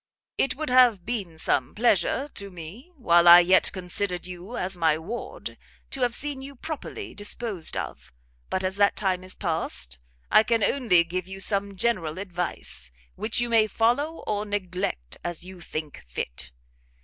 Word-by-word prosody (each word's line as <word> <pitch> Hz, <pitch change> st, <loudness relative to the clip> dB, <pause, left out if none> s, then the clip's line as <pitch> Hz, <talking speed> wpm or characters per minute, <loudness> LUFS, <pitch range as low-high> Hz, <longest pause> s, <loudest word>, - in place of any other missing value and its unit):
It 270 Hz, -, +1 dB
would 305 Hz, -1 st, -3 dB
have 245 Hz, -8 st, +5 dB
been 195 Hz, -9 st, -3 dB
some 130 Hz, -5 st, 0 dB
pleasure 235 Hz, -, +2 dB
to 200 Hz, 0 st, -6 dB
me, 185 Hz, -, -10 dB
while 175 Hz, -, +4 dB
I 175 Hz, +1 st, +11 dB
yet 185 Hz, +2 st, +4 dB
considered 180 Hz, 0 st, -2 dB
you 180 Hz, +6 st, -7 dB
as 185 Hz, +1 st, 0 dB
my 160 Hz, -3 st, +2 dB
Ward, 235 Hz, -, -6 dB, 0.3 s
to 270 Hz, -, -5 dB
have 245 Hz, -1 st, +1 dB
seen 285 Hz, -2 st, -1 dB
you 275 Hz, +1 st, -9 dB
properly 320 Hz, -, -6 dB
disposed 205 Hz, -, -2 dB
of: 75 Hz, -9 st, -6 dB, 0.4 s
but 190 Hz, -, -1 dB
as 190 Hz, +1 st, -1 dB
that 200 Hz, 0 st, +4 dB
time 185 Hz, -3 st, 0 dB
is 185 Hz, -, -1 dB
past, 160 Hz, -, -3 dB, 0.3 s
I -, -, +8 dB
can 225 Hz, 0 st, +1 dB
only 210 Hz, -12 st, +4 dB
give 180 Hz, +2 st, -4 dB
you 190 Hz, 0 st, -7 dB
some 200 Hz, 0 st, +1 dB
general 185 Hz, -7 st, 0 dB
advice, 175 Hz, -, -3 dB, 0.2 s
which 220 Hz, +2 st, -2 dB
you 240 Hz, -, 0 dB
may 225 Hz, -2 st, +4 dB
follow 245 Hz, +10 st, +1 dB
or 210 Hz, -1 st, -1 dB
neglect 185 Hz, -, -3 dB
as 175 Hz, -1 st, -3 dB
you 185 Hz, -1 st, -10 dB
think 155 Hz, -3 st, -6 dB
fit. -, -, -5 dB
190 Hz, 165 wpm, -26 LUFS, 175-235 Hz, 0.4 s, I